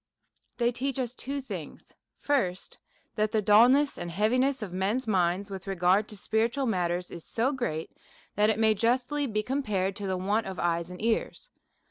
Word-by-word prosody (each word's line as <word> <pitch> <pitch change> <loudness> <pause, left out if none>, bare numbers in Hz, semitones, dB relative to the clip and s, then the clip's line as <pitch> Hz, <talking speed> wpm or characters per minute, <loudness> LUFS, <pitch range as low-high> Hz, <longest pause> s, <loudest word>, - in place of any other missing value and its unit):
They 240 0 +2
teach 265 +2 -3
us 250 -2 -2
two 275 +2 -4
things: 265 - -8 0.2
First, 195 -11 -1 0.3
That 215 -1 0
the 220 - +2
dulness 240 +8 +5
and 175 - -4
heaviness 250 +8 +1
of 185 -4 -7
men's 205 +8 0
minds, 190 -1 0
with 190 0 -7
regard 190 +2 +2
to 210 - -6
spiritu 225 +7 0
al - - +1
matters, 180 -5 -1
is 170 - -7
so 235 +4 0
great, 240 - -3 0.4
that 210 +1 +3
it 215 - +1
may 220 -1 +4
justly 250 +6 0
be 215 -2 -1
compared 210 -8 -1
to 200 - -4
the 190 -1 -1
want 205 +4 0
of 190 -1 -6
eyes 170 0 -1
and 180 - -9
ears. 230 - -1
215 Hz, 180 wpm, -28 LUFS, 190-250 Hz, 0.4 s, dulness